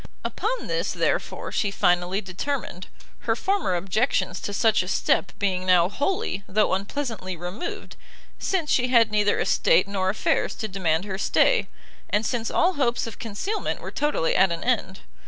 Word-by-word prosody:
Upon 485 +4 -2
this, - - -1
therefore, - - -1
she 205 - 0
finally 180 0 +1
determined: 190 0 -4 0.4
her 225 - +4
former 380 - 0
objections 190 0 0
to - - -4
such 220 +1 +3
a 185 - -6
step 190 - +1
being 185 -2 0
now 180 -1 +4
wholly, 270 - -2
though 210 +1 +2
unpleasantly 200 -2 -3
removed, 180 - -6 0.4
since 345 -6 -1
she 250 0 +3
had 235 -3 +4
neither 210 -1 +2
estate - - +3
nor 190 -2 -1
affairs 200 - 0
to 220 - -4
demand 180 -3 0
her 190 -1 -4
stay, - - +3 0.4
and 210 +2 +1
since 230 -1 -1
all 360 +2 +2
hopes 250 -6 0
of 230 - -8
concealment 235 - -3
were - - -7
totally 295 - 0
at 190 -1 +4
an 170 - -3
end. - - -1
205 Hz, 160 wpm, -25 LUFS, 185-255 Hz, 0.4 s, her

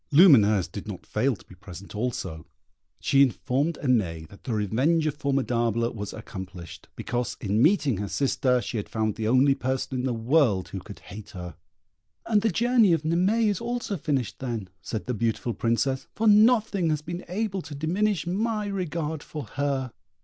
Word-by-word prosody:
Lumineuse 110 - +6
did 100 +3 -8
not 100 -4 -7
fail 135 -1 0
to - - -18
be - - -15
present 95 0 -11
also. 105 -8 -4 0.5
She 135 - +3
informed 140 +4 +1
Aimée 90 - +1
that 100 - -16
the 125 - -2
revenge 130 - +1
of 155 - +1
Formidable 120 -5 0
was 105 -2 -5
accomplished, 95 -5 -9
because, 120 0 -3
in 105 +2 0
meeting 150 - +3
her 100 +1 -3
sister, 125 - +1
she 120 - -4
had 105 - -4
found 110 -1 0
the 110 +1 -3
only 130 +4 +5
person 130 0 -2
in 125 - -2
the - - 0
world 115 - +2
who 95 - -5
could 100 +2 -11
hate 105 +2 -10
her. 90 -2 -7 0.7
"And 210 -2 +3
the 225 - +2
journey 235 -4 +4
of 160 -2 0
Naimée 185 +8 +2
is 205 +2 0
also 235 -3 -2
finished, 130 - -2
then," 115 -7 -4
said 95 +2 -4
the 125 - -2
beautiful 115 +1 -1
Princess, 130 +4 0
"for 225 - -1
nothing 210 -4 +4
has 150 -1 -1
been 175 +3 -5
able 195 0 -2
to 145 -3 -9
diminish 180 +5 0
my 210 +4 -1
regard 165 -6 -3
for 150 -1 -7
her." 135 -3 -2
130 Hz, 180 wpm, -26 LUFS, 110-170 Hz, 0.7 s, Lumineuse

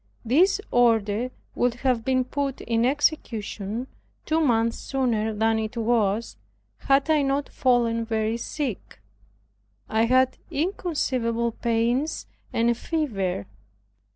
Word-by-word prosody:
This 345 - +4
order 230 -1 +2 0.2
would 245 -1 +1
have 250 -2 0
been 255 0 +2
put 275 +1 -3
in 230 +1 +1
execution 235 -6 -1 0.4
two 315 +1 +1
months 230 -5 +2
sooner 235 -5 0
than 220 +1 +1
it 220 +2 -4
was, 225 -2 0 0.4
had 275 +1 +2
I 305 -2 +4
not 275 +1 0
fallen 235 -3 +2
very 220 0 -1
sick. 255 -2 -5 0.9
I 220 +1 +2
had 255 +2 +3
inconceivable 260 -9 -1
pains 235 +6 0 0.3
and 230 +1 +1
a - - +3
fever. 225 - -2
235 Hz, 115 wpm, -25 LUFS, 225-270 Hz, 0.9 s, This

